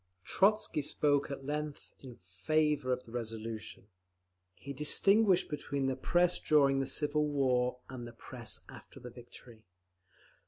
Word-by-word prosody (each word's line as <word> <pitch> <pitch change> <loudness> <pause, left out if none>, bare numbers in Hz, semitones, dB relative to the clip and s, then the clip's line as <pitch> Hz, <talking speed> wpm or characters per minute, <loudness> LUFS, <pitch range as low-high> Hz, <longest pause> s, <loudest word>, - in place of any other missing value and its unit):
'" - - -44
Trotzky 210 -5 +3
spoke 145 0 +1
at 135 -1 -7
length 150 0 -5
in 125 -3 -11
favour 130 - -1
of 125 0 -2
the 115 - -14
resolution. 115 -3 -6 0.7
He 140 - -8
distinguished 195 - +3
between 140 -2 -3
the 135 0 0
Press 175 +6 +1
during 140 -3 +3
the 135 - -1
civil 150 +1 +1
war, 125 -3 +1
and 125 -2 -8
the 120 - -11
Press 120 -1 -6
after - - -13
the 125 - -10
victory. 120 -1 -14
135 Hz, 145 wpm, -32 LUFS, 120-150 Hz, 0.7 s, Trotzky